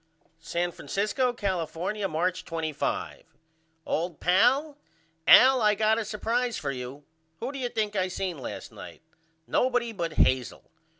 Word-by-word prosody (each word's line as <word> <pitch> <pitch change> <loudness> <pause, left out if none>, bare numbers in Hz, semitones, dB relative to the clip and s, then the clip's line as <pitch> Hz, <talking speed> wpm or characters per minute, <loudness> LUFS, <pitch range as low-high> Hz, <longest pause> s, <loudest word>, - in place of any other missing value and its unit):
San 175 +2 -2
Francisco, 215 +9 -1
California, 195 -1 -2
March 180 +2 -1
25. 160 -3 -4 0.5
OLD 170 0 -2
PAL: 265 - +3 0.5
Al 260 0 +8
I 210 -1 +4
got 220 +2 +2
a 225 - -3
supprise 230 +3 -1
for 140 - -3
you. 130 +2 -7 0.4
Who 250 - -3
do 275 - -7
you 245 -2 -2
think 215 -3 -2
I 185 -1 +1
seen 185 -3 -4
last 130 - -7
night? - - -11 0.4
Nobody 245 -2 +1
but 170 -6 -4
Hazel. 130 -4 +1
195 Hz, 135 wpm, -27 LUFS, 165-235 Hz, 0.5 s, Al